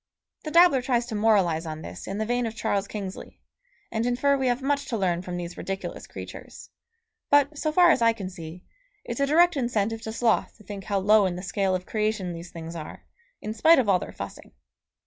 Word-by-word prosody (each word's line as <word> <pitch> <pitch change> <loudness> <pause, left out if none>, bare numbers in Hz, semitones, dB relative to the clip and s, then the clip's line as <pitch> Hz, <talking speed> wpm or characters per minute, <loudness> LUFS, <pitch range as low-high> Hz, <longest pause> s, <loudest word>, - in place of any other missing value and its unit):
The - - -2
dabbler 335 -5 +6
tries 245 -2 0
to 235 - -7
moralise 190 -7 +2
on 155 0 -6
this 90 +1 -8
in 195 - -4
the 220 - -1
vein 245 +1 0
of 225 - -6
Charles 200 -2 -1
Kingsley, 195 -3 -7 0.5
and 225 0 -1
infer 255 +4 +2
we 265 -1 0
have 250 +2 0
much 280 0 0
to 230 - -2
learn 175 -3 0
from 180 -1 -5
these 175 0 -6
ridiculous 195 +1 -5
creatures; - - -10 0.6
but, 285 +1 +4
so 310 +1 -1
far 350 +2 +6
as 255 - +2
I 230 0 +5
can 210 -4 -6
see, 175 -1 -9 0.4
it's - - -5
a 280 - +2
direct 340 +3 +4
incentive 225 -4 -1
to 220 - -5
sloth 230 0 0
to 215 - -17
think 195 -1 -8
how 200 - 0
low 205 +1 +4
in 180 - -3
the 180 - -7
scale 195 0 0
of 180 0 -4
creation 210 -4 -1
these 170 +1 -8
things 165 0 -8
are, 155 -2 -8 0.4
in 215 - -3
spite 320 +10 +6
of 250 - +2
all 190 -2 +4
their - - -7
fussing. 100 0 -9
215 Hz, 220 wpm, -26 LUFS, 185-245 Hz, 0.6 s, dabbler